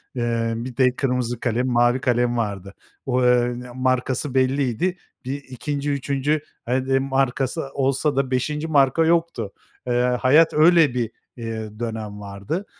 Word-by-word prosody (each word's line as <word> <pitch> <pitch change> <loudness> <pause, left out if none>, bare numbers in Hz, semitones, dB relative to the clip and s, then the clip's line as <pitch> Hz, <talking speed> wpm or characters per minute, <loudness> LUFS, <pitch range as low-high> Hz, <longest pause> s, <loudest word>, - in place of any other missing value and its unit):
Eee, 115 -1 0
bir 120 +1 -6
de 125 -1 +3
kırmızı 125 -3 -1
kalem, 120 +1 0
mavi 120 +1 +2
kalem 120 -1 +1
vardı. 100 -3 -3 0.3
O, 130 -1 +1
eee, 125 0 +3 0.2
markası 130 +1 0
belliydi. 135 +6 +1 0.3
Bir 140 +2 -4
2. 145 +3 -4
3. 140 +2 0 0.2
hadi 130 +2 +1
markası 135 +2 0
olsa 135 +2 +1
da 135 -1 0
5. 150 +5 -1
marka 145 +1 +3
yoktu. 165 -11 0 0.3
Eee, 125 - +1 0.3
hayat 150 +6 +5
öyle 160 -2 +5
bir, 120 -3 -2 0.3
eee, 110 -2 -6
dönem 110 -3 -5
vardı. 100 - -5
130 Hz, 135 wpm, -22 LUFS, 120-140 Hz, 0.3 s, hayat